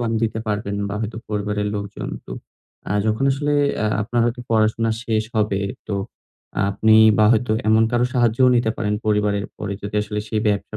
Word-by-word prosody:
কম 120 -1 -1
দিতে 110 -1 -1
পারবেন 105 -1 -2
বা 100 - -4
হয়তো 110 0 -4
পরিবারের 105 0 -2
লোকজন 100 0 -5 0.2
তো - - -7 0.6
আ - - +1
যখন 110 +5 +1
আসলে 145 +2 -1 0.3
আ - - +2 0.2
আপনার 120 +3 -1
হয়তো 120 +1 -2
পড়াশোনা 110 +1 +2
শেষ 110 -2 +1
হবে 105 -2 +1 0.3
তো 100 - -1 0.8
আপনি 110 +2 +3 0.2
বা 105 - +6
হয়তো 115 0 +1 0.2
এমন 110 +1 +5
কারোর 120 +1 +1
সাহায্যও 120 +1 +3
নিতে 120 -2 +1
পারেন 105 -1 -1
পরিবারের 105 -1 +1
পরে 100 -1 -4
যদি 100 +1 -6
আসলে 105 0 -4
সেই 110 -1 -1
ব্যবসা 105 +1 -2
110 Hz, 180 wpm, -21 LUFS, 105-115 Hz, 0.8 s, বা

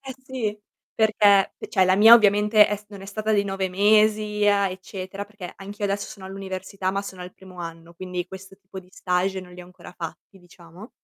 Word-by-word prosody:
eh 265 -1 -8
sì, 220 -6 -4 0.3
perché 210 -3 +3
e - - -8
cioè 190 -1 +3
la 185 +1 +3
mia 225 +3 +9
ovviamente 210 0 +5
è 210 - -2
s 210 - -17
non 200 -2 -11
è - - -9
stata 215 +2 -2
di 200 -1 +3
9 195 -1 -2
mesi 210 +1 +2
a 200 -1 +3
eccetera, 190 +1 -7
perché 205 -3 -10
anch'io 205 +1 -7
adesso 200 0 -1
sono 190 -2 -10
all'università 190 0 -5
ma 200 +1 -2
sono 185 -2 -9
al 180 - -9
primo 185 -1 -15
anno, 165 0 -9
quindi 180 0 -5
questo 190 +1 -12
tipo 190 -1 -12
di 180 - -21
stage 185 +1 -1
non 180 -1 -13
li 180 - -11
ho - - -13
ancora 180 0 -14
fatti, 165 +3 -9
diciamo. 175 +4 -15
195 Hz, 210 wpm, -24 LUFS, 185-210 Hz, 0.3 s, mia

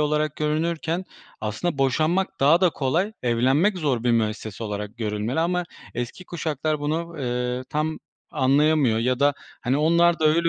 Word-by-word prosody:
olarak 150 0 0
görünürken 165 +3 -1 0.4
aslında 110 +9 -2
boşanmak 155 +8 +1
daha 150 +5 +5
da 185 -2 +4
kolay, 165 +10 0
evlenmek 130 - +2
zor 130 -7 0
bir 120 - +3
müessese 110 -1 -1
olarak 105 +1 -5
görülmeli. 110 +5 -2
Ama 180 +1 0 0.3
eski 120 +9 -5
kuşaklar 155 -3 -2
bunu, 165 +3 -2
eee, 125 0 -2
tam 155 +1 -1 0.3
anlayamıyor 140 -2 +3
ya 125 +3 0
da, 145 0 +4 0.3
hani, 130 +1 +1
onlar 170 +3 +4
da 155 - +2
öyle 170 +2 +3
150 Hz, 150 wpm, -24 LUFS, 125-165 Hz, 0.4 s, daha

